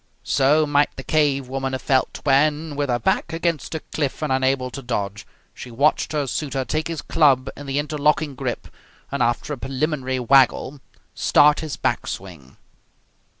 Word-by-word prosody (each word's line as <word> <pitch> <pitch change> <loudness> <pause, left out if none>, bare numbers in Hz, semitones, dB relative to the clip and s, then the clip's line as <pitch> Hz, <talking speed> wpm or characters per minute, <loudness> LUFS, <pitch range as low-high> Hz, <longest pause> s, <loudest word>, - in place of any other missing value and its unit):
So 145 +3 +3
might 145 0 +2
the 135 - -8
cave 140 -4 +1
woman 135 0 -3
have 130 - -3
felt 130 -2 0
when, 150 +2 +2
with 145 -1 -1
her 120 - +2
back 120 +7 0
against 165 -1 -2
a 160 - -3
cliff 145 0 -3
and 150 -3 0
unable 130 -1 0
to 135 - -7
dodge, 105 -4 -4 0.3
she 125 - -10
watched 140 +6 +1
her 150 -2 0
suitor 135 0 -3
take 155 +4 -2
his 165 -3 -5
club 135 -4 +3
in 145 - -10
the 135 +1 -2
interlocking 150 0 0
grip, 130 -2 -4 0.4
and, 140 -1 -2
after 120 +4 0
a 140 - -7
preliminary 135 0 -2
waggle, 135 +2 +3 0.3
start 150 0 +4
his 150 -7 -5
back - - -1
swing. 85 -9 -8
135 Hz, 170 wpm, -22 LUFS, 130-150 Hz, 0.4 s, start